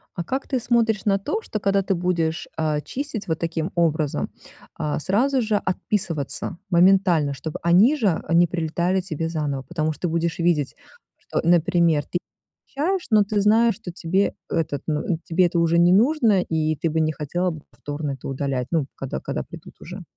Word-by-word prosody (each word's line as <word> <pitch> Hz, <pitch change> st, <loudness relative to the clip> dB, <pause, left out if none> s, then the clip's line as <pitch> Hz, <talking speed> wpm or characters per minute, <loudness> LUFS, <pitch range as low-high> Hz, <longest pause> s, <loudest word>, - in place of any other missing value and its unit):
А 175 Hz, -, -3 dB
как 265 Hz, +10 st, -3 dB
ты 260 Hz, -, 0 dB
смотришь 230 Hz, -4 st, +1 dB
на 200 Hz, -2 st, +3 dB
то, 425 Hz, -, -2 dB
что, 215 Hz, -, -4 dB
когда 195 Hz, 0 st, +2 dB
ты 195 Hz, 0 st, 0 dB
будешь, 170 Hz, -2 st, -1 dB
э, 155 Hz, -2 st, 0 dB
чистить 270 Hz, -6 st, -5 dB
вот 160 Hz, -2 st, -1 dB
таким 165 Hz, +1 st, -2 dB
образом, 155 Hz, -4 st, 0 dB, 0.5 s
э, 150 Hz, -, -1 dB
сразу 250 Hz, -, +1 dB
же 215 Hz, -2 st, 0 dB
отписываться 185 Hz, -6 st, -1 dB
моментально, 175 Hz, -5 st, +4 dB
чтобы 155 Hz, +3 st, -6 dB
они 190 Hz, -, +5 dB
же 230 Hz, -9 st, +2 dB, 0.2 s
они 170 Hz, +2 st, +4 dB
прилетали 170 Hz, +2 st, 0 dB
тебе 165 Hz, -3 st, -3 dB
заново, 145 Hz, -5 st, -2 dB
потому 155 Hz, 0 st, -2 dB
что 175 Hz, +3 st, -3 dB
будешь 165 Hz, +1 st, -1 dB
видеть, 165 Hz, -5 st, +1 dB, 0.4 s
что, -, -, -3 dB
например, 170 Hz, -2 st, +3 dB
ты 175 Hz, -, -2 dB, 0.5 s
щаешь 360 Hz, +6 st, -1 dB
но 215 Hz, -3 st, +5 dB
ты 205 Hz, 0 st, 0 dB
знаешь, 225 Hz, +3 st, +4 dB
что 220 Hz, -6 st, -8 dB
тебе 185 Hz, +3 st, 0 dB, 0.2 s
этот 150 Hz, -4 st, -1 dB
ну, 150 Hz, -2 st, 0 dB, 0.2 s
тебе 180 Hz, +2 st, +3 dB
это 170 Hz, 0 st, -1 dB
уже 170 Hz, 0 st, +3 dB
не 175 Hz, +1 st, +5 dB
нужно, 225 Hz, -2 st, +4 dB
и 155 Hz, -2 st, 0 dB
ты 160 Hz, +3 st, -1 dB
бы 160 Hz, +1 st, 0 dB
не 155 Hz, 0 st, +2 dB
хотела 175 Hz, +5 st, -2 dB
бы 160 Hz, -2 st, -8 dB
повторно 145 Hz, 0 st, -5 dB
это 135 Hz, -2 st, -7 dB
удалять, 135 Hz, -2 st, -2 dB
ну, 160 Hz, -5 st, +1 dB
когда 135 Hz, -, -5 dB
когда -, -, -4 dB
придут -, -, -12 dB
уже? -, -, -8 dB
170 Hz, 180 wpm, -23 LUFS, 155-200 Hz, 0.5 s, они